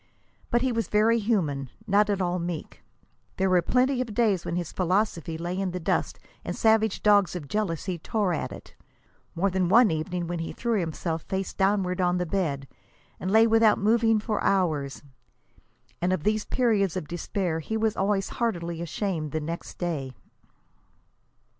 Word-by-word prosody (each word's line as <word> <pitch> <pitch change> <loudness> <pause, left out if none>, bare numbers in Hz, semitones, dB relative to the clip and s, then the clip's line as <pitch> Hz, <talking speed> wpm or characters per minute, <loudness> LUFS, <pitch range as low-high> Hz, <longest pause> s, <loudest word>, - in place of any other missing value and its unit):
But 240 +1 +2
he 260 - +1
was 230 -1 -1
very 225 +2 +3
human 160 - 0 0.2
not 210 0 +3
at 200 -1 0
all 180 0 -1
meek. 170 -2 -5 0.6
There 190 0 +1
were 180 -1 +5
plenty 255 +7 +2
of 230 -5 -5
days 205 -7 +2
when - - -2
his 175 -2 -3
philosophy 180 -3 0
lay 175 +2 -3
in 195 -1 -1
the 180 +1 -4
dust 165 - -1 0.3
and - - -4
savage 220 0 +2
dogs 205 -3 +4
of 160 -5 -6
jealousy 185 -2 -2
tore 200 +1 0
at - - -3
it; - - -11 0.6
more 190 +3 +1
than 185 -1 +1
one 230 +1 +6
evening 170 +3 -2
when 170 0 -3
he 165 - -4
threw 235 -3 0
himself 165 -1 -3
face 190 +2 -3
downward 190 -2 +1
on 180 0 +2
the 180 - -1
bed 155 -7 -2 0.5
and 185 - -3
lay 220 +3 +6
without 225 -1 +4
moving 225 +1 +3
for 215 0 -2
hours. 155 -9 0 1.0
And 180 +1 +1
of 185 -5 -1
these 215 +2 +1
periods 205 -8 +1
of 155 - -5
despair 175 0 -2
he 220 +8 -3
was 220 -1 +1
always 195 0 0
heartily 170 -8 -2
ashamed 170 -2 -3
the 155 - -1
next 165 +3 -6
day. 150 -7 -3
185 Hz, 170 wpm, -26 LUFS, 170-215 Hz, 1.0 s, one